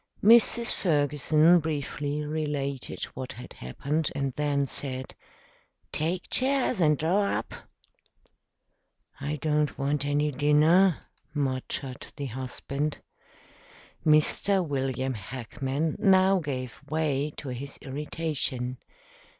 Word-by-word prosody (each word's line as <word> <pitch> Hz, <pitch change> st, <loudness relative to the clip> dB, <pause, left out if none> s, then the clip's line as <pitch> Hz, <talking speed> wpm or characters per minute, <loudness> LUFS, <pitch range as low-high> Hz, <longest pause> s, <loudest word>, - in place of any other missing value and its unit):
Mrs. 235 Hz, +2 st, +5 dB
Ferguson 155 Hz, +1 st, +3 dB
briefly 150 Hz, -1 st, -2 dB
related 145 Hz, -3 st, -3 dB
what 130 Hz, 0 st, -6 dB
had 125 Hz, -, -10 dB
happened, 145 Hz, -, -2 dB
and 140 Hz, -2 st, -1 dB
then 145 Hz, -1 st, +1 dB
said, 130 Hz, -1 st, -5 dB, 0.8 s
"Take 170 Hz, +4 st, -1 dB
chairs 260 Hz, -5 st, +1 dB
and 150 Hz, -2 st, +4 dB
draw 190 Hz, +7 st, +1 dB
up." -, -, -6 dB, 1.7 s
"I 150 Hz, +2 st, -2 dB
don't 150 Hz, 0 st, 0 dB
want 140 Hz, 0 st, 0 dB
any 145 Hz, +1 st, +1 dB
dinner," 150 Hz, +6 st, +4 dB, 0.4 s
muttered 135 Hz, -1 st, -3 dB
the 145 Hz, -, -4 dB
husband. 135 Hz, +4 st, -3 dB, 1.0 s
Mr. 165 Hz, +4 st, +3 dB
William 130 Hz, -2 st, -1 dB
Hackman 130 Hz, -, -3 dB
now 190 Hz, 0 st, +5 dB
gave 130 Hz, -6 st, -5 dB
way 150 Hz, -2 st, 0 dB
to 140 Hz, -, -6 dB
his 135 Hz, +3 st, -6 dB
irritation. 135 Hz, -3 st, -3 dB
145 Hz, 100 wpm, -28 LUFS, 135-160 Hz, 1.7 s, Mrs